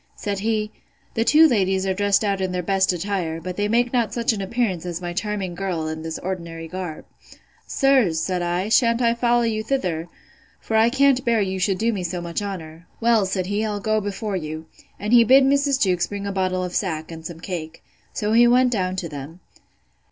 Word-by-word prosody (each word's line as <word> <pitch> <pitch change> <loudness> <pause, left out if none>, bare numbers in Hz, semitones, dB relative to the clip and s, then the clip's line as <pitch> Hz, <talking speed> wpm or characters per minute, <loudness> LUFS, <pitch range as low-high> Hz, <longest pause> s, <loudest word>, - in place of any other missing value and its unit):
Said 200 -1 -3
he, 215 0 -1 0.4
The 225 - +1
two 305 +6 +5
young 320 - +8
ladies 190 -5 +1
are 190 - +1
dressed 200 +1 +2
out 200 -2 0
in 185 -1 -1
their 180 0 -2
best 190 +1 +2
attire; 180 -3 -2
but 180 +2 -6
they 205 +1 0
make 240 +3 +1
not 235 -3 0
such 235 -1 +1
an 205 - -4
appearance 195 -4 -1
as 175 -2 -4
my 175 -1 -5
charming 200 -1 -3
girl 175 -3 -3
in 160 0 -4
this 160 0 -5
ordinary 170 -3 -5
garb.—Sir, 185 - -2
said 175 +3 -1
I, 175 +3 -1
shan't 230 +1 +3
I 230 0 +3
follow 240 0 +2
you 220 -2 0
thither? 180 -10 -2 0.5
For 220 - -4
I 220 +1 +5
can't 275 0 +3
bear 235 -2 +2
you 190 -2 -1
should 185 0 +1
do 230 +3 +1
me 195 - -3
so 175 0 -3
much 170 +2 -4
honour. 170 -4 -7
Well, 230 -4 +3
said 185 -1 -2
he, 205 +3 -1
I'll 210 -2 -2
go 215 +1 0
before 205 0 -3
you. 155 -2 -5 0.3
And 210 +3 -2
he 235 -1 +8
bid 265 +4 +6
Mrs. 280 0 +2
Jewkes 180 -5 +1
bring 200 -1 -5
a 200 - -2
bottle 185 -1 -1
of 180 -1 -5
sack, 160 -5 -2
and 165 -1 -9
some 165 0 -8
cake. 165 -3 -6 0.3
So 210 0 -1
he 240 +1 +6
went 250 +1 +4
down 185 -5 -1
to 180 -2 -3
them. 150 +3 -9
195 Hz, 215 wpm, -22 LUFS, 175-225 Hz, 0.5 s, young